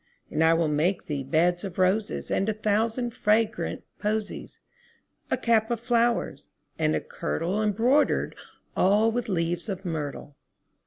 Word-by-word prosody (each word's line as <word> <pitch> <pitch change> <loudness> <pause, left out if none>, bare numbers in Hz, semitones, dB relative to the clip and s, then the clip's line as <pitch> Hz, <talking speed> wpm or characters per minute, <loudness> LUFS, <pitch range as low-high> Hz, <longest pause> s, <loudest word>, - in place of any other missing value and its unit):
And 160 - +1
I 165 0 +5
will 165 -1 +2
make 155 +6 0
thee 145 -3 -3
beds 170 +7 +1
of 190 -3 -6
roses 190 +3 0
And 195 - +1
a - - +1
thousand 220 +3 0
fragrant 220 -2 0 0.2
posies; 215 0 -3 0.7
10 260 - +1
A - - -17
cap 225 -2 +3
of 235 -2 -1
flowers, 235 0 0 0.3
and - - +2
a - - +1
kirtle 215 - -2
Embroider'd 230 +8 +2 0.4
all 210 +4 +4
with 240 -1 -2
leaves 175 +2 -1
of 190 0 -5
myrtle. 145 -3 -4
210 Hz, 150 wpm, -26 LUFS, 170-225 Hz, 0.7 s, I